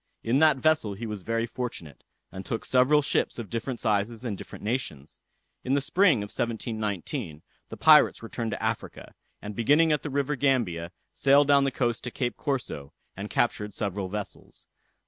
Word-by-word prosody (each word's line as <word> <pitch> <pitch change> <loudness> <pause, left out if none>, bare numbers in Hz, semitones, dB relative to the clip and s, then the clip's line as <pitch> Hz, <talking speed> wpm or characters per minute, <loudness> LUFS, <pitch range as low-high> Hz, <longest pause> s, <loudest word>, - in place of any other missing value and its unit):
In 120 +4 +2
that 155 -3 +5
vessel 140 -8 +1
he 115 +4 -6
was 105 -3 -5
very 115 +4 -1
fortunate, 115 - -6 0.3
and 95 - -7
took 115 - -4
several 130 +4 +4
ships - - 0
of 115 -4 -7
different 120 +2 -3
sizes 110 +3 -1
and 110 -4 -2
different 95 - -10
nations. 105 - -4 0.4
In 130 +2 +1
the - - +3
spring 160 - +3
of 105 - -7
1719, 110 - -3 0.3
the - - -8
pirates - - +6
returned 115 0 -4
to - - -4
Africa, - - -4 0.3
and 105 0 -6
beginning 150 +8 +4
at 150 - +1
the 150 - -5
river 140 +1 -1
Gambia, 110 -12 0 0.2
sailed 140 +1 +4
down 140 -1 +5
the - - +2
coast 120 -3 -1
to - - -2
Cape 120 0 -3
Corso, 120 - -4 0.2
and 100 +2 -6
captured 105 -4 0
several 100 -2 -3
vessels. 105 +1 -7
115 Hz, 175 wpm, -27 LUFS, 105-135 Hz, 0.4 s, pirates